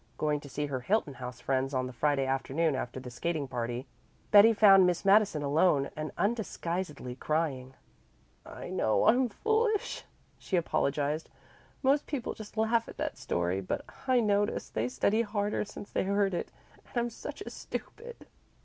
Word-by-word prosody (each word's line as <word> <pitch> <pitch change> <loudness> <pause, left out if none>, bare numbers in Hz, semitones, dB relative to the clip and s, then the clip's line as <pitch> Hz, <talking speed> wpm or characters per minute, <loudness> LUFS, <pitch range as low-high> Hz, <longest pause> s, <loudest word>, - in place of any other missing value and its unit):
Going 150 -1 0
to 145 - -12
see 145 +2 -2
her 135 -3 -3
Hilton 170 - 0
House 125 -2 -7
friends 135 0 -1
on 130 0 +1
the 125 - -7
Friday 140 +1 +1
afternoon 135 +4 0
after 130 -1 -4
the 125 -1 -9
skating 155 +3 -2
party, 120 +1 -3 0.5
Betty 210 +2 +9
found 195 -4 +7
Miss 180 +2 -1
Madison 200 -6 +4
alone 145 -1 +2
and 155 0 -4
undisguisedly 180 - -2
crying. 135 -5 -2 0.7
"I - - -9
know 110 - +2
I'm 250 +2 +4
foolish," 440 - 0 0.3
she 190 - -2
apologized. 150 -1 0 0.5
"Most 280 +2 +3
people 275 -6 -3
just 215 0 -11
laugh 225 +1 +2
at - - -11
that - - -2
story, 90 +2 -1
but 95 - -3 0.2
I 255 -1 +4
notice 205 -1 0
they 110 +3 -1
study 200 - +2
harder 205 -1 -1
since 205 0 -10
they - - 0
heard 200 0 +1
it. 175 - -3 0.3
And - - -10
I'm 240 0 +1
such - - -8
a - - -8
stupid." 475 0 -8
165 Hz, 165 wpm, -30 LUFS, 135-210 Hz, 0.7 s, Betty